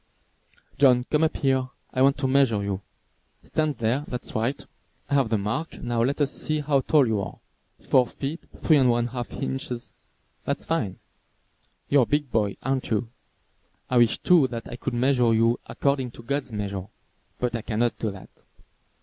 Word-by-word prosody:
John, 125 -3 +5
come 150 +1 +3
up 160 - -2
here, 130 -2 +1 0.3
I 130 - 0
want 135 +1 +5
to 135 - 0
measure 130 -6 +3
you. 100 -1 -3 0.6
Stand 155 -3 -1
there, 120 +5 0
that's 125 0 -5
right. 115 +5 -1 0.5
I - - +1
have 135 -5 +3
the 110 - +2
mark, 105 +11 -3
now 120 -1 -1
let 140 +5 0
us 140 - +3
see 155 0 +2
how 145 -1 +2
tall 145 0 +4
you 110 -3 0
are. 100 - -6 0.4
Four 125 -2 +3
feet, 145 +7 -5 0.2
three 155 - +5
and 130 -3 +4
one 120 0 +1
half 120 -1 -5
inches. 130 -3 -4 0.5
That - - 0
is - - -8
fine. 110 - -1 0.9
You 140 - +4
are - - +7
a - - +3
big 145 -2 0
boy, 105 -3 0
aren't 135 0 -1
you? 110 +1 0 0.8
I 125 - +3
wish 120 -2 +4
too 170 -7 +4
that 115 -2 -6
I - - -6
could 120 - -4
measure 125 -2 +3
you 115 +1 +3
according 140 -3 0
to 115 - -12
God's 140 +1 -2
measure. 100 -3 -4 0.5
But 125 -1 -1
I 115 - -2
cannot 115 -1 -1
do 110 - -1
that. 95 -2 -12
125 Hz, 185 wpm, -25 LUFS, 115-140 Hz, 0.9 s, are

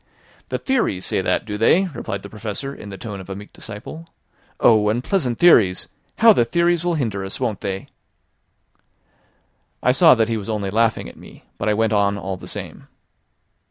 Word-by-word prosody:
"The - - -1
theories 235 - -1
say - - 0
that, 95 - 0
do 105 -2 -5
they?" 170 - +4
replied 120 - -6
the 100 - -9
Professor 110 +6 -5
in 105 - -10
the 95 - -8
tone 105 -3 -7
of 95 - -11
a 95 - -5
meek 105 +1 -11
disciple. 120 +10 -9 0.5
"Oh! 105 -2 +4
unpleasant 125 - 0
theories! 105 - +4 0.3
How 225 0 +7
the 120 - +3
theories 170 +6 +1
will 175 -1 0
hinder 110 -10 -2
us, 95 - -5
won't 105 - -2
they?" 95 -1 -4 2.0
I 125 - +4
saw 160 +3 +6
that 110 -2 +1
he 115 -1 -1
was 105 0 -7
only 100 -3 -2
laughing 115 +1 +1
at - - -13
me; - - -15 0.2
but 105 - 0
I 105 - +2
went 110 0 +1
on 100 -1 +2
all 95 -1 -4
the 90 - -11
same. - - -7
110 Hz, 190 wpm, -21 LUFS, 100-135 Hz, 2.0 s, How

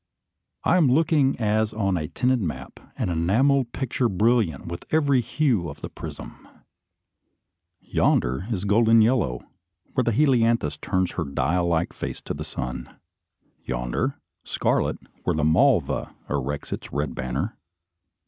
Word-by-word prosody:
I 180 - +4
am 150 -8 +4
looking 150 -2 +3
as 110 0 +1
on 100 -3 +1
a 75 -3 -2
tinted 125 +7 +1
map, 85 -6 -5 0.2
an - - -1
enamelled 120 +10 +2
picture 125 -2 -1
brilliant 105 - +1
with 85 0 -6
every 145 -5 +3
hue 120 - 0
of 75 0 -10
the - - -5
prism. - - -9 1.3
Yonder 65 +10 +1
is 100 -4 -2
golden 110 +2 +5
yellow, 110 - +1 0.5
where 130 - +2
the 120 - +1
helianthus 115 - +2
turns 95 -1 0
her 85 - -2
dial 85 +5 0
like 85 0 0
face - - -5
to - - -4
the - - -5
sun. 65 -1 -6 0.7
Yonder, 60 -1 -2 0.2
scarlet, - - 0 0.3
where - - 0
the 75 - 0
malva 80 0 +2
erects 70 0 -3
its - - -7
red 75 +1 -2
banner. 65 0 -3
105 Hz, 140 wpm, -24 LUFS, 80-125 Hz, 1.3 s, golden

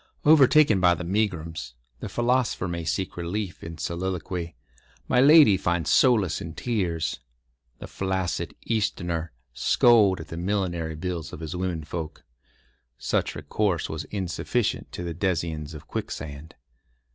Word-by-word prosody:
Overtaken 150 -6 +6
by 90 -1 +4
the 90 - -6
megrims, 85 - -2 0.2
the - - -6
philosopher 120 -5 0
may 85 -1 -3
seek 95 +3 -2
relief 90 +2 -4
in 80 0 -7
soliloquy; 90 0 -4 0.5
my 125 - +4
lady 145 -8 +7
find 85 -1 -1
solace 105 - +3
in 80 -1 -7
tears; 90 -9 -1 0.6
the - - -8
flaccid 95 -2 -2
Easterner 85 -7 -1 0.2
scold 100 - +4
at 80 - -9
the 80 - -6
millinery 85 -4 -2
bills 85 -1 -4
of - - -7
his 80 +2 -5
women 90 -3 -2
folk. 80 0 -6 0.7
Such - - -1
recourse 95 -7 -1
was - - -4
insufficient 100 +4 -2
to 90 - -5
the 85 -1 -4
denizens 80 -4 -2
of 75 -1 -10
Quicksand. 75 +2 -6
90 Hz, 135 wpm, -26 LUFS, 80-105 Hz, 0.7 s, lady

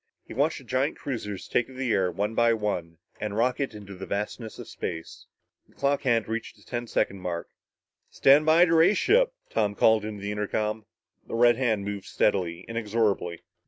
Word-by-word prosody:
He - - -10
watched 145 +6 +1
the 135 - -11
giant 130 +4 0
cruisers 105 -8 -5
take 120 - +1
to 130 - -13
the 130 -3 0
air 95 -2 +2
one 105 +5 -2
by 115 0 +4
one 90 -6 -3 0.2
and 105 -1 -3
rocket 125 +1 0
into 100 -2 -9
the 95 0 -8
vastness 105 +2 -4
of - - -9
space. 80 -2 -6 0.4
The - - -26
clock 140 0 +1
hand 115 -4 +1
reached 115 +1 -4
the - - -21
ten 120 -1 -4
second 100 -3 0
mark. 85 -2 -4 0.6
"Stand 140 +3 +5
by 160 +3 +6
to 165 - +1
raise 170 +5 +5
ship!" - - +4 0.2
Tom 105 -1 0
called 110 +1 +4
into 105 -2 -6
the 100 - -2
intercom. 105 +1 -2 0.4
The - - -4
red 120 0 +5
hand 110 -6 0
moved 100 -1 -4
steadily, 90 -5 0
inexorably. 105 -6 -1
110 Hz, 190 wpm, -27 LUFS, 100-130 Hz, 0.6 s, by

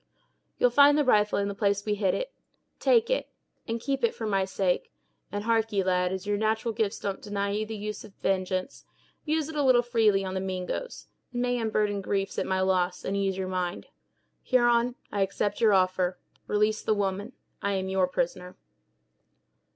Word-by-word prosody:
You'll 245 - +3
find 285 +3 +6
the 295 - +2
rifle 210 -4 +3
in 200 - 0
the 200 - -3
place 200 0 0
we 210 - +1
hid 200 -2 +1
it; - - -4 0.5
take 470 -1 +3
it, - - 0 0.4
and 230 0 -2
keep 270 +2 -2
it 235 - +2
for 225 - -5
my 195 -3 +1
sake; 190 -1 -1 0.4
and, 205 0 -3
harkee, 225 -3 +1
lad, 180 -1 +1
as 190 +1 -4
your 205 0 0
natural 220 +2 0
gifts 215 -2 -1
don't 200 -1 -4
deny 200 -1 -2
you 215 +1 -2
the 220 0 -5
use 210 +1 -5
of 195 - -14
vengeance, 185 -1 -2 0.4
use 310 -1 0
it 320 - -7
a 295 - +1
little 255 -3 +5
freely 220 -5 +2
on 185 - -4
the 190 - -1
Mingoes; 190 - -4 0.3
it 245 - -6
may 245 0 0
unburden 210 -2 0
griefs 195 0 -2
at - - -2
my 190 0 +1
loss, 185 -1 0
and 195 - -1
ease 195 -1 0
your 190 -1 -2
mind. 180 -1 -3 0.5
Huron, 240 -1 +3 0.2
I 200 - -1
accept 200 +2 -1
your 220 -2 +5
offer; 185 -1 +2 0.3
release 210 +1 +1
the 215 - +1
woman. 200 +3 -2 0.3
I 200 - 0
am 190 -1 -1
your 190 -1 +2
prisoner!" 180 0 -3
205 Hz, 190 wpm, -27 LUFS, 190-230 Hz, 0.5 s, find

